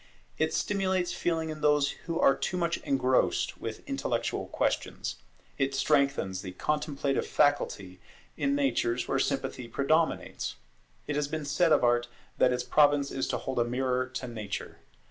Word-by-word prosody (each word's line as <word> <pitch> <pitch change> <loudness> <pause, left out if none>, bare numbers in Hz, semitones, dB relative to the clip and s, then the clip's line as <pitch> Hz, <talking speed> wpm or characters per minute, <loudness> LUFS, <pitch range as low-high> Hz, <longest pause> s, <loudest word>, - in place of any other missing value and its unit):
It - - +2
stimulates 190 -3 0
feeling 160 -2 -1
in 155 0 -7
those 150 -1 +3 0.2
who 165 -1 -1
are 135 - +6
too 180 - -2
much 170 -1 0
engrossed 130 -2 +1
with - - -6
intellectual - - -2
questions: - - -2 0.4
it 135 0 +1
strengthens 140 -10 +1
the 95 -2 -7
contemplative 145 - -1
faculty 100 -10 +1 0.4
in 140 0 +1
natures 125 -3 +1
where - - +1
sympathy 125 - -2
predominates. 155 +6 0 0.5
It 145 - -2
has 150 -1 0
been 155 0 -4
said 155 +4 +2
of - - +5
Art 120 0 +3 0.3
that 125 - +5
its 125 0 -1
province 145 +1 +3
is 135 - -2
to - - -1
hold 130 -2 -3
a - - +4
mirror 125 +1 0
to 130 0 -5
nature. 110 -4 -6
140 Hz, 155 wpm, -29 LUFS, 125-150 Hz, 0.5 s, are